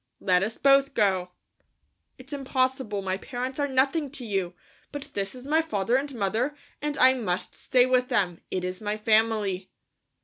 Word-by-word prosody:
Let 180 Hz, -1 st, +3 dB
us 215 Hz, +3 st, -2 dB
both 275 Hz, 0 st, +4 dB
go." 190 Hz, -4 st, +2 dB, 0.9 s
"It's 265 Hz, +2 st, -11 dB
impossible; 260 Hz, -6 st, -1 dB
my 190 Hz, 0 st, -1 dB
parents 255 Hz, +4 st, -5 dB
are 285 Hz, -, +1 dB
nothing 275 Hz, +3 st, +1 dB
to 260 Hz, -5 st, -5 dB
you, 190 Hz, -4 st, -2 dB, 0.4 s
but 290 Hz, -1 st, -5 dB
this 200 Hz, +4 st, -3 dB
is 250 Hz, 0 st, -11 dB
my 310 Hz, +3 st, +3 dB
father 235 Hz, -8 st, 0 dB
and 275 Hz, 0 st, -1 dB
mother, 230 Hz, +7 st, 0 dB, 0.3 s
and 295 Hz, 0 st, -2 dB
I 260 Hz, +1 st, +6 dB
must 205 Hz, -9 st, -2 dB
stay 250 Hz, -1 st, +3 dB
with 255 Hz, -1 st, +2 dB
them. 175 Hz, -7 st, 0 dB
It 185 Hz, -, -2 dB
is 185 Hz, +2 st, -5 dB
my 210 Hz, 0 st, -2 dB
family." 215 Hz, -3 st, +1 dB
245 Hz, 170 wpm, -26 LUFS, 195-270 Hz, 0.9 s, I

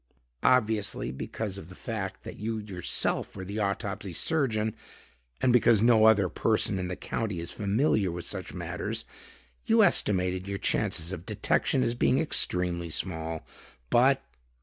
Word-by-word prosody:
Obviously, 110 Hz, -, +2 dB
because 100 Hz, -, -5 dB
of 85 Hz, -, -11 dB
the 90 Hz, -, -11 dB
fact -, -, -5 dB
that -, -, -9 dB
you 110 Hz, +2 st, -2 dB
yourself 100 Hz, -5 st, 0 dB
were 95 Hz, -1 st, -6 dB
the 100 Hz, +3 st, -4 dB
autopsy 100 Hz, -2 st, -2 dB
surgeon, 110 Hz, -, 0 dB, 0.7 s
and 125 Hz, -, +3 dB
because 115 Hz, -3 st, +5 dB
no 115 Hz, -2 st, +6 dB
other 105 Hz, -4 st, +5 dB
person 95 Hz, +2 st, +1 dB
in 90 Hz, -, -2 dB
the 90 Hz, -, -4 dB
County 105 Hz, -3 st, -3 dB
is 85 Hz, 0 st, -6 dB
familiar 105 Hz, -, +1 dB
with 85 Hz, 0 st, -6 dB
such -, -, -4 dB
matters, -, -, -5 dB, 0.6 s
you -, -, +5 dB
estimated 90 Hz, -1 st, +2 dB
your 100 Hz, 0 st, -3 dB
chances 85 Hz, -2 st, 0 dB
of 90 Hz, -3 st, -7 dB
detection 130 Hz, -, +1 dB
as 120 Hz, -1 st, +1 dB
being 125 Hz, +2 st, +2 dB
extremely 90 Hz, -, 0 dB
small. 80 Hz, -1 st, -3 dB, 0.5 s
But...." -, -, +4 dB
100 Hz, 150 wpm, -28 LUFS, 90-110 Hz, 0.7 s, no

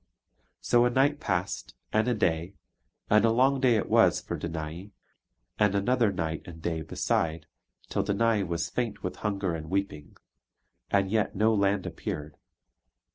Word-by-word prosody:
So 120 Hz, 0 st, +4 dB
a -, -, +3 dB
night 140 Hz, +4 st, +2 dB
passed, 95 Hz, -, -3 dB, 0.2 s
and 110 Hz, +2 st, +2 dB
a 125 Hz, -, +2 dB
day, 85 Hz, -1 st, 0 dB, 0.5 s
and 105 Hz, 0 st, +4 dB
a 115 Hz, -, +5 dB
long 130 Hz, +4 st, +3 dB
day 125 Hz, -3 st, +4 dB
it 105 Hz, -, 0 dB
was -, -, +4 dB
for -, -, -5 dB
Danae; 80 Hz, +3 st, -5 dB, 0.7 s
and 105 Hz, -1 st, +3 dB
another 115 Hz, +2 st, +2 dB
night 80 Hz, -4 st, -3 dB
and 85 Hz, -2 st, -9 dB
day 80 Hz, 0 st, -2 dB
beside, 80 Hz, +1 st, -1 dB, 0.4 s
till -, -, -1 dB
Danae 110 Hz, +1 st, +1 dB
was 85 Hz, -2 st, -2 dB
faint 120 Hz, -3 st, -3 dB
with 90 Hz, -, -4 dB
hunger 100 Hz, -4 st, -2 dB
and 80 Hz, -1 st, -6 dB
weeping, 95 Hz, -6 st, -3 dB, 0.7 s
and 100 Hz, -1 st, +1 dB
yet 110 Hz, -2 st, +1 dB
no 110 Hz, +3 st, +3 dB
land 100 Hz, -2 st, +1 dB
appeared. 75 Hz, 0 st, -5 dB
100 Hz, 155 wpm, -28 LUFS, 85-110 Hz, 0.7 s, a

